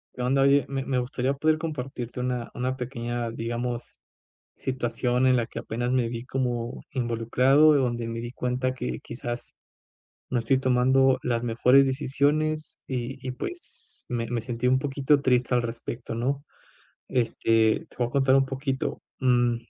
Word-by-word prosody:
Que 125 - -5
onda, 135 +2 +3
oye, 140 +1 +5
me 135 -1 -2
me 130 -2 0
gustaría 125 +2 -1
poder 155 +3 +2
compartirte 130 -6 -5
una 125 -1 -2
una 130 +1 -2
pequeña, 120 -2 -3
digamos, 120 +1 -4 0.5
situación 125 0 0
en 130 0 +5
la 120 - +1
que - - -7
apenas 120 +2 -3
me 125 -3 +2
vi 115 0 -5
como 125 -3 -2
involucrado, 125 +5 +4
donde 120 -3 0
me 115 0 -4
di 120 +1 -6
cuenta 125 +1 -1
que, 125 -1 -4
quizás 120 0 -6 0.8
no 125 - +1
estoy 125 +4 +2
tomando 130 +1 +3
las 120 -1 0
mejores 125 +4 +5
decisiones 150 +3 0
y 125 0 -4
y 130 - -2
pues, 350 - -8
me 120 -1 -2
me 120 -1 0
sentí 120 +1 -3
un 130 +1 +4
poquito 140 +1 +2
triste 125 -2 +2
al 120 - +3
respecto, 115 0 -5
¿no? 135 +4 -1 0.7
Este, 115 -2 +2
te - - -19
voy 120 - +2
a - - -7
contar 135 0 +3
un 135 0 +4
poquito, 135 0 -3 0.2
mm, 120 -2 +3
125 Hz, 160 wpm, -26 LUFS, 120-135 Hz, 0.8 s, oye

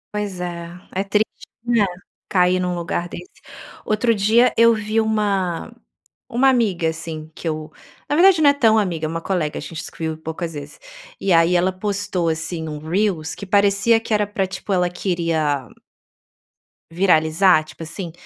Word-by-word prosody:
Pois 205 -3 -3
é, 170 -1 -5 0.2
é 190 - 0
triste, 210 +2 +1 0.4
né, 235 -3 +3 0.4
cair 180 -2 +3
num 180 0 -1
lugar 175 0 -3
desse. 365 - -8 0.6
Outro 225 +2 +2
dia 220 +5 +4
eu 230 0 +6
vi 215 +1 0
uma 200 -5 -1 0.6
uma 255 +3 +3
amiga 205 -10 +1
assim 160 -1 -6
que - - -6
eu 155 0 -4 0.4
na 290 - +1
verdade 360 0 +6
não 290 - +7
é - - +5
tão 225 -6 +4
amiga, 170 -6 -1
é - - -5
uma 165 +1 -3
colega, 165 -5 -2
a - - -7
gente 160 +1 -7
se - - -9
viu 160 -1 -2
poucas 160 +1 -5
vezes. 145 - -9 0.4
E 195 - +1
aí 165 +1 +4
ela 185 +1 +2
postou 195 -3 -2
assim 160 0 -3
um 150 - -5
reels 165 -1 -1
que 200 - -8
parecia 200 +3 +3
que 225 - -4
era 210 -1 +2
pra, 195 -2 -1
tipo, 190 +2 -7
ela 180 -1 +2
queria 165 - -1 1.2
viralizar, 165 -1 +4
tipo 155 - -14
assim, 165 +2 -6
185 Hz, 170 wpm, -21 LUFS, 165-210 Hz, 1.2 s, não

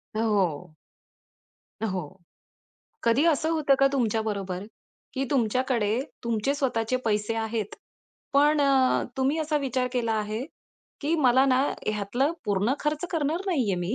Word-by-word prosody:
हो. 195 -9 0 1.1
हो. 185 -6 -3 1.0
कधी 235 +6 +3
असं 320 0 +2
होतं 310 -4 +3
का 275 - +6
तुमच्याबरोबर? 210 -6 -1 0.5
की 270 - -1
तुमच्याकडे 240 -3 +1 0.2
तुमचे 235 +4 0
स्वतःचे 255 -4 0
पैसे 210 0 0
आहेत. 220 -2 -3 0.6
पण 295 +2 +4
अ, 270 -2 +3
तुम्ही 270 +4 +1
असा 310 -1 0
विचार 260 -2 -1
केला 235 -3 0
आहे, 215 +2 -2 0.6
की 310 +3 0
मला 260 -2 +5
ना 260 0 +3 0.2
ह्यातलं 215 +8 0
पूर्ण 205 +5 +1
खर्च 300 +2 -1
करणार 320 0 0
नाही 325 -10 +1
आहे - - +1
मी, 180 +6 -2
245 Hz, 130 wpm, -26 LUFS, 215-280 Hz, 1.1 s, का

